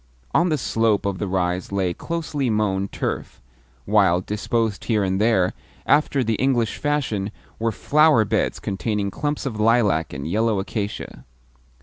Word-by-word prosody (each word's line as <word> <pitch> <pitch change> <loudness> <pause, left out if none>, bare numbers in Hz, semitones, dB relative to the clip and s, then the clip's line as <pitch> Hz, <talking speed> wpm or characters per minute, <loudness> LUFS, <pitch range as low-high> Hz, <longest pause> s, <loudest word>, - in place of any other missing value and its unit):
On 175 +2 +3
the 155 - +1
slope 110 -5 +1
of 100 -2 -2
the 105 - -2
rise 90 0 -1
lay 95 -3 0
closely 150 - -3
mown 100 -3 0
turf, - - -4 0.5
while, 95 -4 +4
disposed 105 +2 -2
here 110 -3 +1
and 95 +1 0
there, 105 -5 +3 0.3
after 140 -3 +3
the 115 -1 0
English 120 -4 +1
fashion, 130 -10 -1 0.3
were 115 0 +1
flower 145 - +4
beds - - 0
containing 100 +1 -2
clumps 145 +5 -3
of 110 -5 -4
lilac 105 -8 +2
and 70 +1 -5
yellow 110 +4 +1
acacia. 100 - -4
105 Hz, 145 wpm, -22 LUFS, 95-120 Hz, 0.5 s, while